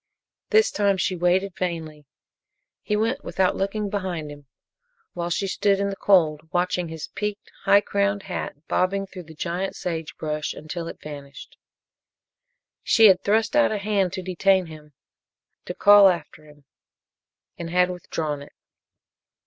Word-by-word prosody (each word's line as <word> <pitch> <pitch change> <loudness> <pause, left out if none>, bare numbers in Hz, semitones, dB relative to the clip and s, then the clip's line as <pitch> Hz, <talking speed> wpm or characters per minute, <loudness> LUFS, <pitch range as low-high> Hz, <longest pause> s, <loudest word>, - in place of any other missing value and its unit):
This 435 -2 +4
time 200 -1 +1
she 185 0 0
waited 180 +2 +1
vainly. 160 -5 -4 0.7
He 210 - -1
went 230 +7 -1
without 190 -1 0
looking 205 +2 -2
behind 185 -7 -4
him, 145 -1 -13 0.7
while 175 0 -3
she 185 +3 -1
stood 195 +1 +1
in 200 0 0
the - - -5
cold 160 -6 +2
watching 180 0 0
his 160 -1 -7
peaked 210 0 -5
high 200 - +6
crowned 200 -1 0
hat 160 -4 -6
bobbing 195 +2 0
through 185 -2 -10
the 160 +1 -13
giant 180 +4 -3
sagebrush 155 -2 -4
until 165 +2 -6
it - - -8
vanished. 140 -2 -10 1.3
She 220 -2 +6
had 185 -1 +4
thrust 220 +5 +1
out 295 -5 +4
a 215 - -1
hand 200 -2 0
to 190 -1 -4
detain 185 +1 +2
him 155 -2 -13 0.7
to - - -6
call 205 -1 +7
after 160 -3 -4
him 150 -1 -18 1.0
and 170 -1 -5
had 180 +1 +2
withdrawn 155 -4 -4
it. 140 - -13
180 Hz, 150 wpm, -24 LUFS, 160-200 Hz, 1.3 s, call